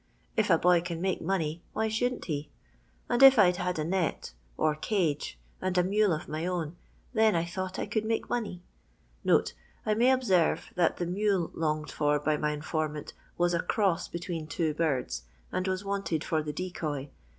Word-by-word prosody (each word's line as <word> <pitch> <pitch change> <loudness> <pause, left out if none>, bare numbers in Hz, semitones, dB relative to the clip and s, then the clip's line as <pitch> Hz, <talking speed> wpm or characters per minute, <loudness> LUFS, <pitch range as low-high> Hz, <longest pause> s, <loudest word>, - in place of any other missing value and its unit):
If 215 -2 +2
a 165 - +6
boy 175 0 +4
con 170 -1 -4
make 190 +1 -1
money, 165 -3 -1
why 220 +1 0
shouldn't 245 +3 -1
hel 150 -3 -2 0.6
And 240 - +1
if 270 -1 +10
I'd 180 -4 +5
had 180 -2 -1
a 155 - 0
net, 175 +1 -1 0.2
or 155 -1 +2
cage, 155 -2 -1 0.2
and 185 -1 -1
a 180 - +5
mule 205 +2 +3
of 155 -1 -2
my 155 +3 -3
own, 175 -3 -2 0.4
then, 220 -3 +4
I 165 0 +1
thought, 185 +2 -4
I - - -1
could 215 0 -1
make 225 +1 -1
money." 210 -7 -3 1.2
[I 215 - +2
may 240 +4 +4
observe 190 -11 +2
that 175 -2 +2
the 175 - -1
mule 190 -1 0
longed 155 -1 -1
for 150 -1 +2
by 150 +1 +1
my 150 0 0
informant 150 0 -3 0.2
was 175 0 +2
a 170 - +2
"cross" 195 -2 +1
between 170 -2 -5
two 160 -1 -1
birds, 130 - -1 0.3
and 185 - -1
was 190 +1 -2
wanted 195 -5 -1
for 160 -3 0
the 150 0 -4
decoy. 150 -5 -4
175 Hz, 185 wpm, -29 LUFS, 155-195 Hz, 1.2 s, if